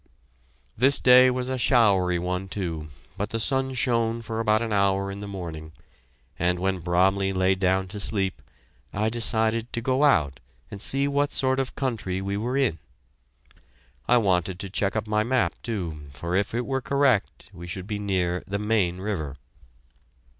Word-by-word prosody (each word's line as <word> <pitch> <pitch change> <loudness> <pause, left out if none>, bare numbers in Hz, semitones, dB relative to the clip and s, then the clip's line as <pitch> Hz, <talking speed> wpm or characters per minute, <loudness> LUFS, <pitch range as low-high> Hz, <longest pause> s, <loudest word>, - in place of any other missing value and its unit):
This 135 +5 +4
day 125 0 +7
was 125 0 -2
a 130 0 -2
showery 100 -9 +3
one, 90 +2 -3
too, 85 -6 -4 0.3
but 105 +1 -2
the 115 - -3
sun 130 +2 +1
shone 115 -2 0
for 110 0 -4
about 110 0 +2
an 110 -2 -2
hour 100 -1 +1
in 100 - -7
the 105 - -6
morning, 80 -5 -7 0.7
and 90 +1 +1
when 95 +1 -1
Bromley 95 +3 +2
lay 95 0 +2
down 95 0 +1
to 105 - -6
sleep, 95 -6 -1 0.5
I 105 +2 0
decided 115 0 +1
to 120 - 0
go 130 +4 +1
out 75 - +3 0.3
and 100 - -8
see 140 +4 0
what 145 +1 0
sort 130 0 +1
of 135 -1 -3
country 110 -9 -2
we 100 +1 -3
were 120 +6 -2
in. 125 -12 +1 1.3
I 125 - +5
wanted 95 -4 +1
to 100 -2 -6
check 100 0 -1
up 110 -1 -1
my 105 0 +1
map, 125 +1 +1
too, 85 -10 -4
for 85 +7 -3
if 100 +3 0
it 120 +1 -1
were 135 -1 -1
correct, 135 -8 0
we 85 -1 -9
should 90 +1 -5
be 105 0 -4
near 90 -3 -1
the 100 +1 -2
Main 105 -4 0
River. 85 -8 -4
100 Hz, 175 wpm, -25 LUFS, 90-120 Hz, 1.3 s, day